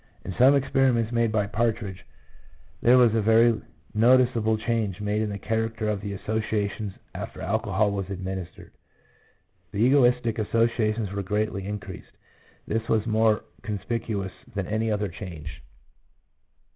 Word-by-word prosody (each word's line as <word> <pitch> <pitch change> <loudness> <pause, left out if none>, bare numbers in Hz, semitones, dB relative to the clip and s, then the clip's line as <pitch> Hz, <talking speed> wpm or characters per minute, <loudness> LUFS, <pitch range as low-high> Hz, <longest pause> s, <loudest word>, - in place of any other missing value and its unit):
In 95 - -4
some 130 +8 +6
experiments 130 -4 +2
made 115 -2 +1
by 105 -2 +1
Partridge, 105 -2 -2 0.7
there 125 +2 +6
was 120 -3 +5
a 115 - +2
very 115 +1 +4 0.3
noticeable 115 -1 +4
change 110 -4 -1
made 105 +1 -1
in 110 - -1
the 100 - -4
character 115 +1 -2
of 105 -2 -1
the 100 -1 -4
associations 105 -1 -2 0.2
after - - -7
alcohol 105 +1 0
was 100 -1 -3
administered. 95 -2 -6 1.0
The - - -6
egotistic 125 -4 +3
associations 110 -1 +1
were 100 0 -2
greatly 100 0 -2
increased; 105 -1 -7 0.5
this 110 0 -2
was 110 -1 +2
more 110 -1 +2 0.2
conspicuous 105 -2 -3 0.2
than 100 -2 -1
any 110 +3 -1
other 105 -1 0
change. 80 -6 -8
110 Hz, 135 wpm, -26 LUFS, 100-115 Hz, 1.0 s, some